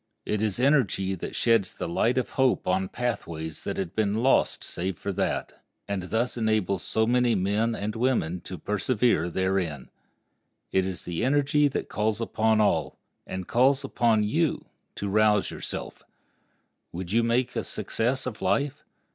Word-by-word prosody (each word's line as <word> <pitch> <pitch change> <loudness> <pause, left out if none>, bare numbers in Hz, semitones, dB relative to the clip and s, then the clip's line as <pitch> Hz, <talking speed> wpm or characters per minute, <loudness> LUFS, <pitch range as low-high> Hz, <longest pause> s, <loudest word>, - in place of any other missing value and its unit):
It 105 -1 -1
is 110 -1 0
energy 125 -8 +2
that 95 - -6
sheds 115 -5 +2
the - - -4
light 115 +9 +1
of 130 - -1
hope 130 -1 +1
on 95 +1 +1
pathways 85 -10 -4
that - - -3
had 95 -2 -3
been 110 +1 +1
lost 135 - +3
save 90 0 -3
for 100 - -3
that, 95 +1 -2 0.2
and 100 -2 -2
thus 120 +2 0
enables 110 -5 +1
so 110 - 0
many 120 0 +3
men 105 +4 +1
and 105 0 -3
women 115 -8 0
to 90 - -6
persevere 105 -1 +1
therein. 95 -6 -1 0.8
It 95 0 +2
is 95 -2 -6
energy 140 - +2
that 140 - -3
calls 105 0 -1
upon 110 -1 +1
all—and 95 -2 -2
calls 135 +3 +3
upon 115 -5 +2
you—to 130 -4 -2
rouse 105 0 +3
yourself. - - -6 0.9
Would 90 +1 -6
you 115 +2 +4
make 120 +2 +1
a - - -1
success 125 +4 -2
of 120 -5 -5
life? 140 +9 0
110 Hz, 150 wpm, -26 LUFS, 95-125 Hz, 0.9 s, you